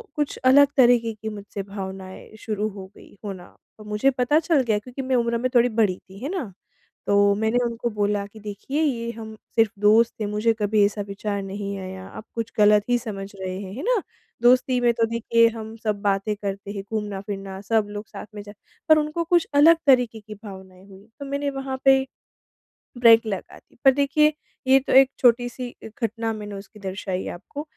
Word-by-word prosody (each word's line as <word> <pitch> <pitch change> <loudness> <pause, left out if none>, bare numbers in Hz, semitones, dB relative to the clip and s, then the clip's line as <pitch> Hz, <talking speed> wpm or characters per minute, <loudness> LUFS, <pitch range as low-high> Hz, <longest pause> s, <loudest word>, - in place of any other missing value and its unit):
कुछ 295 -1 -2
अलग 280 +2 +7
तरीके 240 -3 +4
की 220 +1 -6
मुझसे 205 -1 -7
भावनाएँ 190 -1 -8
शुरू 215 -1 -2
हो 195 -2 -9
गई - - -17
होना, 190 -3 -8 0.2
और 215 - -12
मुझे 210 +6 +2
पता 265 +4 +2
चल 325 -3 +2
गया 215 -3 +1
क्योंकि 250 +5 -8
मैं 260 0 0
उम्र 235 -1 +1
में 255 +2 -1
थोड़ी 240 0 +5
बड़ी 215 -5 +1
थी, 190 +1 -15
है 280 - -2
ना? 320 - -4 0.6
तो 200 0 +4
मैंने 220 +3 0
उनको 235 0 -2
बोला 205 -1 0
कि 220 - -12
देखिए 215 +8 -4
ये 235 -6 -1
हम 220 -1 -9 0.2
सिर्फ़ 225 -2 +3
दोस्त 220 +3 +5
थे - - 0
मुझे 210 +2 +1
कभी 210 0 +2
ऐसा 205 0 -2
विचार 200 0 -3
नहीं 200 +1 -5
आया, 185 0 -7
आप 215 - -10
कुछ 230 0 -3
गलत 210 0 +6
ही 245 - +4
समझ 205 -5 -6 0.2
रहे 185 0 -4
हैं। 190 -1 -8
है 270 - -6
ना? 470 -2 +2 0.4
दोस्ती 250 +1 +4
में 240 - +4
तो 230 0 +1
देखिए 230 0 +3
हम 220 -1 -8
सब 210 -2 -1
बातें 200 +1 0
करते 200 -1 -5
हैं, 200 -1 -5
घूमना-फिरना 195 -2 -5
सब 215 +1 +1
लोग 205 0 -7
साथ - - -9
में 205 - -6
जा 205 - -11 0.4
पर 310 - +8
उनको 305 +3 -2
कुछ 345 0 +2
अलग 320 +4 +7
तरीके 245 -4 +4
की 215 0 -10
भावनाएँ 190 -2 -11
हुईं, 195 +1 -15
तो 280 - -6
मैंने 280 +1 -2
वहाँ 270 -1 -4
पे 270 0 +7 1.0
ब्रेक 230 -1 +7
लगा 195 -4 -5
दी। - - -24
पर 270 - +9
देखिए, 290 +2 +3 0.3
ये 265 +1 +6
तो 270 - -3
एक 265 0 +7
छोटी 245 0 +4
सी 245 0 -7
घटना 225 0 -3
मैंने 210 -1 -7
उसकी 195 +2 -11
दर्शायी 190 -1 -4
आपको 285 +11 -7
220 Hz, 200 wpm, -23 LUFS, 200-250 Hz, 1.0 s, पर